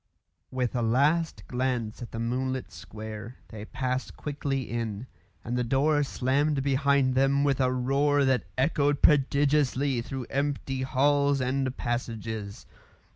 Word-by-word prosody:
With 130 -1 -2
a 120 - +1
last 145 +8 +1
glance 125 -3 -2
at 120 - -7
the - - -6
moonlit 130 +3 -2
square, 110 +2 -8
they 110 -1 -8
passed 130 +2 -3
quickly 140 -2 -3
in, 115 -2 -4 0.4
and 120 - -3
the 125 - +1
door 145 +5 +2
slammed 140 +1 0
behind 140 -1 +2
them 135 +2 +3
with 140 -2 +2
a 130 -1 +2
roar 140 +3 +2
that 130 -4 +1
echoed 145 +1 +1
prodigiously 140 -2 +3
through 130 +1 -5
empty 135 -1 -1
halls 140 +2 +2
and 130 0 -1
passages. 110 -4 -4
130 Hz, 130 wpm, -27 LUFS, 120-140 Hz, 0.4 s, them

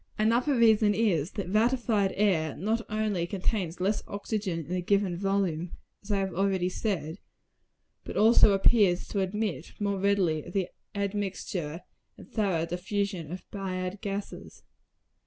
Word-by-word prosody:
Another 235 +6 +2
reason 220 -3 +5
is, 185 -7 +1
that 200 -4 -4
ratified 220 -2 +2
air 170 -8 +1
not 220 +7 0
only 210 -5 -1
contains 185 -2 -2
less 200 +3 +1
oxygen 200 -5 -3
in 170 - -10
a 180 - 0
given 195 0 +1
volume, 185 -3 -1 0.3
as 205 - -8
I 205 - +2
have 195 -1 -1
already 190 -1 +1
said, 180 -4 -3 0.8
but - - -6
also 215 -1 +6
appears 195 -2 +3
to 200 - -1
admit 195 -2 -2
more 200 -2 -1
readily 190 -6 +2
of 175 - -10
the 190 -2 0 0.3
admixture 195 -5 -3 0.4
and - - -13
thorough 190 -7 0
diffusion 180 -1 -3
of 180 0 -6
bad 185 -1 -4
gases. 200 0 -6
195 Hz, 140 wpm, -28 LUFS, 180-210 Hz, 0.8 s, also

